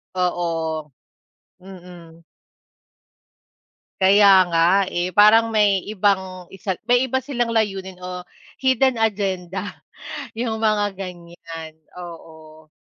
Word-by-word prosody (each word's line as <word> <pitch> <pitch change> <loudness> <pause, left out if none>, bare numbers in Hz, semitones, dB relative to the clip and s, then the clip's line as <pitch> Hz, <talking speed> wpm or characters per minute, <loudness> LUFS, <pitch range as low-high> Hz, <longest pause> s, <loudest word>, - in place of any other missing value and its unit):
Oo. 165 -4 -2 0.7
Mm. 175 -3 -14 1.8
Kaya 200 +2 +6 0.2
nga, 165 0 +2 0.3
eh, 175 0 -3
parang 215 +2 +6
may 205 -2 +3
ibang 190 -3 -1
isa 195 0 -4
may 245 +1 +2
iba 260 +1 -1
silang 240 -4 -2
layunin 195 -4 -1
o 180 0 -7 0.3
hidden 260 -2 +2
agenda 195 -3 -2 0.6
yung 225 -1 -4
mga 205 -2 +1
ganyan. 170 -3 -9 0.3
Oo. 160 -2 -12
190 Hz, 95 wpm, -21 LUFS, 175-215 Hz, 1.8 s, Kaya